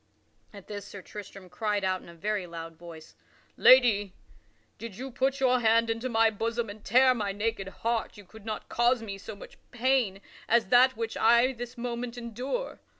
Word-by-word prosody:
At 200 -3 -12
this 205 -2 -7
Sir 200 -2 -10
Tristram 195 -1 -10
cried 205 +2 -2
out 185 -1 0
in - - -14
a 170 - -13
very 200 +1 -2
loud 165 -1 -8
voice: 165 -1 -12 0.4
"Lady, 215 -7 +5 0.7
did 230 -4 -8
you 265 +1 -6
put 265 +3 0
your 255 -1 +3
hand 230 0 +3
into 230 +3 -3
my 225 -1 +3
bosom 225 +1 -2
and 210 0 -13
tear 255 +3 +5
my 210 -5 -2
naked 205 -1 -2
heart, 230 +3 -3
you 205 - -13
could 220 +3 -15
not 215 0 -5
cause 240 0 +2
me 200 -3 -6
so 215 +2 -8
much 200 - -13
pain 240 -5 +1 0.3
as 235 -3 +3
that 255 0 +5
which 225 -1 -3
I 235 +3 +4
this 240 0 -8
moment 240 0 -4
endure. 245 - -5
225 Hz, 185 wpm, -28 LUFS, 200-245 Hz, 0.7 s, Lady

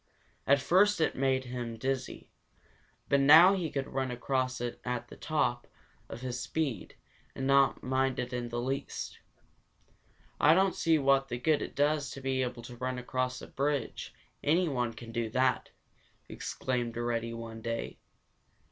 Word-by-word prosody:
At 140 +1 +5
first 200 +6 +3
it 160 - +2
had - - -6
made 130 -1 +2
him 120 -2 -5
dizzy, 130 +3 -3 0.8
but 140 - +3
now 160 +7 +8
he 180 -5 -1
could 135 -2 -2
run 130 -1 -2
across 130 +1 -1
at 120 0 -4 0.3
the - - -10
top 120 -6 -1 0.4
of 115 - -8
his 125 -1 -4
speed 135 +1 -3 0.4
and 135 - -3
not 135 0 +3
mind 130 0 0
it 125 0 -3
in 120 -1 -3
the 120 0 -3
least. 135 +3 -4 1.2
"I 150 +3 +6
don't 190 0 +3
see 165 -1 +2
what 135 -1 +3
good 130 +5 +1
it - - -6
does 145 -1 +1
to - - -8
be 130 0 0
able 120 -2 -3
to 120 0 -10
run 130 +1 -3
across 125 +1 -2
a - - -8
bridge; 140 -3 -2 0.3
anyone 145 -8 +1
can 115 +1 -10
do 115 -1 -2
that!" 130 +2 +1 0.6
exclaimed 120 -3 -3
Reddy 115 -1 -2
one 115 -1 -8
day. 115 0 -4
130 Hz, 155 wpm, -30 LUFS, 120-140 Hz, 1.2 s, now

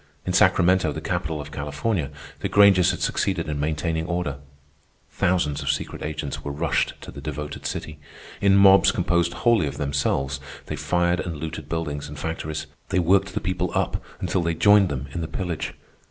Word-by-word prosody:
In 90 - -1
Sacramento, 90 0 +4
the - - -4
capital 80 -3 -2
of 75 - -7
California, 75 +3 -2 0.3
the - - -2
Grangers 100 -3 +6
had - - -2
succeeded - - 0
in 75 -2 -3
maintaining 80 +2 -1
order. 85 -5 -2 0.7
Thousands 80 -5 +1
of 70 - -3
secret 75 - -2
agents 75 -1 -4
were 70 - -4
rushed 80 +4 0
to - - -9
the - - -9
devoted 75 -1 -5
city. 75 -1 -5 0.4
In 100 0 +5
mobs 100 0 +7
composed 85 0 +1
wholly 115 -9 +2
of - - -5
themselves, 70 -1 -1 0.3
they 75 - -4
fired 85 +4 +1
and 85 -3 -4
looted 80 -1 -6
buildings 75 -4 -3
and 75 - -8
factories. 80 -1 -4 0.2
They - - 0
worked 95 +2 +3
the - - +1
people 90 -1 -1
up - - 0 0.2
until 95 - 0
they 85 0 0
joined 100 +3 +5
them 70 -1 -3
in 85 - -4
the 80 - -3
pillage. 90 -2 -4
80 Hz, 180 wpm, -24 LUFS, 75-90 Hz, 0.7 s, mobs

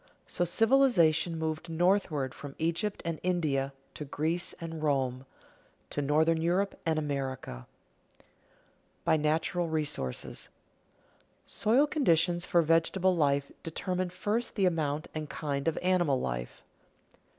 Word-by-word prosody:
So 175 - -1
civilization 175 - +3
moved 160 +1 -3
northward 165 -5 +1
from 140 -2 -9
Egypt 170 +6 -1
and 165 -2 -2
India 150 -7 0 0.2
to - - -6
Greece 160 +5 -2
and 165 -1 -6
Rome, 135 -3 0 0.6
to 145 - -1
northern 160 +3 +2
Europe 185 +4 +1
and 160 -1 +2
America. 135 - -4 0.5
[Sidenote: - - -27 0.8
By 160 - +4
natural 160 +3 0
resources] 150 - -3 1.0
Soil 240 +7 +3
conditions 175 - +2
for 170 -1 +4
vegetable 165 +3 +2
life 140 -3 +1
determine 180 +3 -2
first 215 +6 -2
the 200 -4 +2
amount 155 -4 0
and 155 -2 -4
kind 140 -1 -3
of 165 - +1
animal 175 -7 +2
life. - - -4
160 Hz, 120 wpm, -30 LUFS, 145-180 Hz, 1.0 s, By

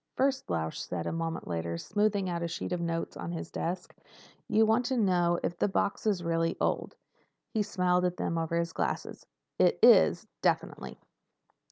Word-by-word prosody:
"First," 265 - 0
Lausch 80 -2 -2
said 85 -2 -4
a - - -1
moment 165 0 -3
later, 85 -1 -2
smoothing 205 - 0
out 170 -1 -2
a 170 - -1
sheet 165 - -5
of 180 -1 -1
notes 165 -1 -2
on 170 - -5
his 165 - -6
desk, 180 +2 -4 0.5
"you 220 +1 +4
wanted 245 +4 +2
to 240 - +2
know 175 -3 +2
if 175 - -1
the - - +3
box 200 +2 -1
is 195 -5 +1
really 165 0 0
old." - - -1 0.6
He 220 - +1
smiled 180 -3 +1
at 180 0 -1
them 165 - -1
over 165 0 -1
his 170 -1 -1
glasses. - - -3 0.3
"It - - +4
is—definitely. - - +3
175 Hz, 175 wpm, -30 LUFS, 165-200 Hz, 0.6 s, you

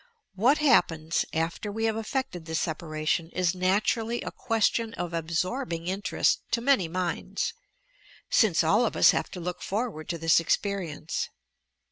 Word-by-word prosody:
What 240 +10 +3
happens 165 - +2
after 165 +6 -2
we 225 +2 -3
have 220 -1 +1
effected 220 -6 -3
this 160 0 -1
separation 155 0 -2
is 180 -1 +1
naturally 210 +5 0
a - - -5
question 225 -1 0
of 175 -1 -4
absorbing 170 - -2
in 190 +3 -2
terest - - +2
to 235 - +3
many 245 -7 +3
minds, 180 - -2 0.7
since 190 -7 +3
all 205 +9 +4
of 235 - -1
ua - - -1
have - - -2
to 180 - -8
look 180 +1 -5
for 225 +5 -1
ward 155 -3 -10
to 170 - -2
this 165 0 +4
experience. 170 -3 -2
185 Hz, 155 wpm, -27 LUFS, 165-225 Hz, 0.7 s, all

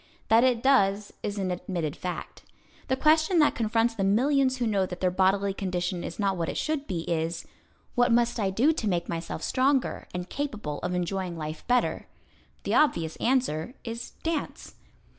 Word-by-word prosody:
That 225 +2 +6
it 250 -2 +2
does 205 -7 +3
is 205 0 -3
an 190 -2 -1
admitted 175 -4 -3
fact. 180 -1 -6 0.5
The 260 - +2
question 315 +5 +3
that 300 -2 +5
confronts 230 0 +1
the 205 -4 -2
millions 260 +6 +3
who 245 - -1
know 200 -4 +1
that 180 -1 -7
their 185 -1 +1
bodily 195 +2 +2
condition 180 -2 -2
is 170 - -6
not 195 -2 0
what 165 -1 -1
it - - -4
should 305 -2 -2
be 175 -4 -2
is: 165 0 -2 0.5
"What 245 -1 +3
must 235 0 +2
I 200 -3 +1
do 250 +12 +3
to 220 -8 -2
make 175 -2 -1
myself 165 -1 -4
stronger, 265 0 +1
and 180 0 -5
capable 215 - -4
of 180 0 -2
enjoying 180 0 -2
life 155 0 -6
better?" 250 0 +1 0.6
The - - -1
obvious 170 - +2
answer 245 - 0
is: 230 0 -6
"Dance." 325 -3 -3
200 Hz, 180 wpm, -27 LUFS, 180-255 Hz, 0.6 s, That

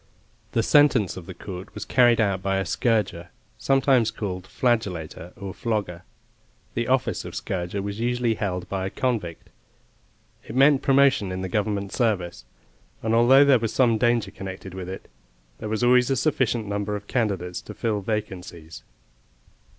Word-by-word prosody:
The 115 - +2
sentence 130 -9 +4
of 90 -3 -9
the 95 - -8
court 95 0 -9
was - - -5
carried 120 -2 +4
out 100 -4 +1
by 95 0 0
a 95 - -1
scourger, 105 -4 0 0.3
sometimes 135 -4 +3
called 95 -5 -5
flagellator, 95 -9 -2
or 100 -2 -6
flogger. 105 -7 -3 0.7
The - - -2
office - - 0
of - - -8
scourger 95 +2 -3
was 100 +1 -5
usually 120 0 +1
held 90 -4 -3
by 95 -1 -2
a - - -3
convict; 105 -9 -3 0.9
it - - -9
meant 140 +1 +5
promotion 135 -7 +3
in 95 0 -4
the - - -2
Government 100 0 -2
service, 90 - -1 0.6
and 110 0 0
although 130 +5 +6
there 135 -3 +5
was 115 -1 -3
some 115 -4 +3
danger 120 -1 +1
connected 95 -1 -8
with 95 -1 -6
it, 95 - -8 0.5
there 110 - -5
was 110 +2 -1
always 125 +1 +4
a 135 - +2
sufficient 125 -5 0
number 105 0 -2
of 100 0 -7
candidates 95 -7 -2
to - - -10
fill 110 -3 -1
vacancies. 95 -6 -5
105 Hz, 160 wpm, -24 LUFS, 95-120 Hz, 0.9 s, although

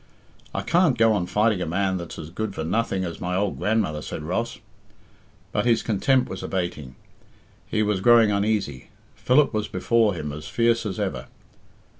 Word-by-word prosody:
"I - - -3
can't 170 -7 +3
go 115 -1 +4
on 90 -4 -1
fighting 105 -1 +1
a 90 - -2
man 95 +2 0
that's 85 -2 -7
as 80 0 -8
good 105 +2 -4
for 80 - -3
nothing 95 +2 -1
as 85 -2 -7
my 90 +1 -2
old 100 +1 -1
grandmother," 105 -9 0
said 75 - -6
Ross. 105 +9 -2 0.9
But - - 0
his 115 -1 +3
contempt 125 +4 +2
was - - -6
abating; 85 -8 -4 0.7
he 110 - 0
was 105 -3 0
growing 115 -1 +6
uneasy; 100 -10 -1 0.2
Philip 140 +2 +3
was 105 -1 -1
before 110 +2 +1
him 75 -3 -4
as 75 +1 -8
fierce 115 +3 +1
as 95 -1 -5
ever. 65 -11 -3
100 Hz, 175 wpm, -24 LUFS, 85-115 Hz, 0.9 s, growing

